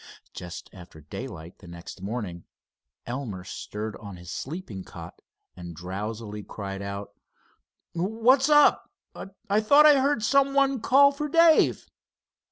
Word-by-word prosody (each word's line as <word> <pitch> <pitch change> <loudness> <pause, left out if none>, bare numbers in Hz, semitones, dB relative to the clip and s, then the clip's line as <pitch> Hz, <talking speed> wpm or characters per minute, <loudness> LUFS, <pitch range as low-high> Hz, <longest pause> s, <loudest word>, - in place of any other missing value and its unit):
Just 90 -1 -8
after 90 -4 -13
daylight 80 +3 -9
the 90 - -15
next 85 +2 -10
morning 100 -5 -5 0.6
Elmer 120 -7 -5
stirred 105 +3 -6
on 100 -3 -10
his 85 0 -10
sleeping 135 - -6
cot 85 -1 -11 0.3
and 85 -2 -9
drowsily 105 +5 -6
cried 100 -1 -7
out: 100 0 -6 0.8
"What's 230 - +2
up? 295 -1 +5 0.6
I 205 +2 +2
thought 285 +7 +6
I 295 -2 +7
heard 275 -4 +1
some 275 +2 +2
one 275 -3 +2
call 280 +4 +5
for 295 +1 -4
Dave." 330 +1 +4
110 Hz, 130 wpm, -26 LUFS, -, 0.8 s, I